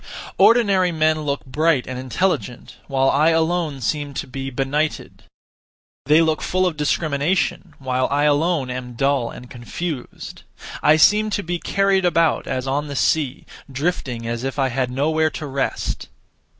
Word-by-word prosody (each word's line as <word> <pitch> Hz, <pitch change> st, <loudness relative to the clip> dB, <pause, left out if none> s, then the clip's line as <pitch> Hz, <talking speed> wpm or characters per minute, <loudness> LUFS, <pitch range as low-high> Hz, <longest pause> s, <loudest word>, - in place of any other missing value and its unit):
Ordinary 200 Hz, -6 st, +4 dB
men 155 Hz, -1 st, +1 dB
look 140 Hz, -2 st, -3 dB
bright 150 Hz, +1 st, +1 dB
and 130 Hz, 0 st, -6 dB
intelligent, 130 Hz, -1 st, -2 dB
while 135 Hz, -1 st, +2 dB
I 150 Hz, +3 st, +3 dB
alone 160 Hz, -3 st, 0 dB
seem 145 Hz, +3 st, -2 dB
to -, -, -3 dB
be 135 Hz, +1 st, -6 dB
benighted. 140 Hz, +4 st, -2 dB, 0.8 s
They 155 Hz, +3 st, +6 dB
look 160 Hz, -1 st, 0 dB
full 185 Hz, 0 st, 0 dB
of 180 Hz, -3 st, 0 dB
discrimination, 150 Hz, +3 st, -1 dB
while 130 Hz, -1 st, -1 dB
I 145 Hz, +1 st, +1 dB
alone 150 Hz, -2 st, +1 dB
am 125 Hz, -1 st, -6 dB
dull 135 Hz, -1 st, +1 dB
and 125 Hz, -, -10 dB
confused. 125 Hz, +4 st, -6 dB, 0.4 s
I 155 Hz, +1 st, +5 dB
seem 210 Hz, +6 st, +4 dB
to 205 Hz, -1 st, -2 dB
be 175 Hz, +1 st, -3 dB
carried 195 Hz, 0 st, +1 dB
about 165 Hz, -2 st, +2 dB
as 130 Hz, 0 st, -2 dB
on 145 Hz, +3 st, -1 dB
the 140 Hz, -, -6 dB
sea, 140 Hz, -1 st, 0 dB, 0.3 s
drifting 130 Hz, -5 st, -2 dB
as 115 Hz, +1 st, -3 dB
if 135 Hz, +1 st, -3 dB
I 135 Hz, -2 st, +1 dB
had 130 Hz, 0 st, -1 dB
nowhere 155 Hz, +5 st, +1 dB
to 155 Hz, -, -7 dB
rest. 135 Hz, -1 st, -3 dB
145 Hz, 155 wpm, -21 LUFS, 130-165 Hz, 0.8 s, They